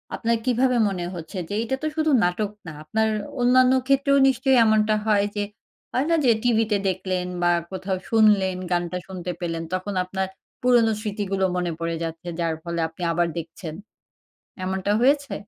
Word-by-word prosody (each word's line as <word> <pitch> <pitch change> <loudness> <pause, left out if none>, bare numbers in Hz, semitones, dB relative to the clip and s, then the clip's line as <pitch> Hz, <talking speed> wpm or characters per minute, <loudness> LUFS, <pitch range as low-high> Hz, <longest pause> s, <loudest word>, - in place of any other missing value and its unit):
আপনার 230 0 0
কিভাবে 250 0 +2
মনে 185 -3 -3
হচ্ছে 170 +3 -8
যে 205 - -3
এটা 235 +3 -1
তো - - +1
শুধু 315 -1 +1
নাটক 190 +4 0 0.2
না। - - -5
আপনার 220 +8 0 0.3
অন্যান্য 255 +1 +5
ক্ষেত্রেও 275 0 +3
নিশ্চয়ই 265 0 +2
এমনটা 215 0 +3
হয় 205 -2 +3
যে, 205 - 0 0.5
হয় 260 - 0
না 335 - +4
যে 245 - +6
টিভিতে 225 -3 +2
দেখলেন 185 0 -2 0.2
বা 175 - +4 0.2
কোথাও 190 0 -3
শুনলেন, 210 -4 +4 0.2
গানটা 175 0 0
শুনতে 180 -1 -5
পেলেন 165 -1 -3
তখন 185 +2 -2
আপনার 190 +1 -3 0.3
পুরনো 240 -3 +4
স্মৃতিগুলো 200 -2 -1
মনে 175 -1 -1
পড়ে 165 0 -2
যাচ্ছে, 165 +1 -6
যার 165 -1 0
ফলে 170 -1 -3
আপনি 165 +2 -9
আবার 175 +1 +1
দেখছেন। 165 0 -6 0.9
এমনটা 190 +2 -1
হয়েছে? 280 +2 +2
200 Hz, 165 wpm, -24 LUFS, 180-235 Hz, 0.9 s, যে